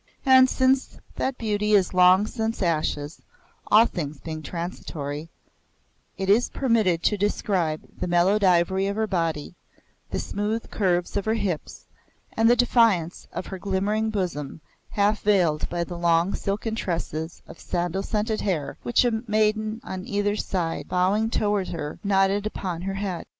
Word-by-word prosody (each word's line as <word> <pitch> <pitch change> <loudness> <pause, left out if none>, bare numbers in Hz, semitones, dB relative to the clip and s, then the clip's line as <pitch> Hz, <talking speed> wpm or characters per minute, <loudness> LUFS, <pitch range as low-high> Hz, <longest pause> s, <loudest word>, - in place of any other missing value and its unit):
And 260 -1 +7
since 260 0 +1 0.2
that 265 -1 -1
beauty 210 -1 0
is 195 -3 +3
long 185 +2 +6
since 225 -2 -3
ashes 155 -3 -1 0.5
(all 220 +2 +6
things 150 -9 -5
being 155 0 -6
transitory), 155 -3 -5 0.9
it 190 - -3
is 215 +5 +4
permitted 220 -10 +1
to 210 - +2
describe 190 -6 0 0.2
the - - -2
mellowed 180 +4 +3
ivory 190 +1 +3
of 200 - -2
her 220 0 0
body, 165 -7 -2 0.6
the - - -3
smooth 210 +3 -3
curves 180 -4 0
of 200 - -2
her 220 +1 +1
hips, 185 -8 -4 0.5
and 225 +1 +3
the 240 - +6
defiance 230 -8 +2
of - - -5
her 190 - -7
glimmering 205 +3 0
bosom, 175 -9 -3 0.3
half 205 +1 +1
veiled 180 -7 +2
by 170 0 -1
the 170 0 -7
long 170 +2 +2
silken 210 +3 -2
tresses 165 -5 -4
of - - -12
sandal 175 +1 -2
scented 215 +2 -1
hair 170 -8 -2
which 240 +1 +2
a 225 -2 0
maiden 215 +1 +1
on 185 0 -6
either 205 0 0
side, 175 -5 -2
bowing 195 +5 +1
toward 205 -4 0
her, 150 -3 -5
knotted 200 +1 +2
upon 180 -5 -4
her 195 +1 -3
head. 195 -4 -4
195 Hz, 155 wpm, -25 LUFS, 175-215 Hz, 0.9 s, And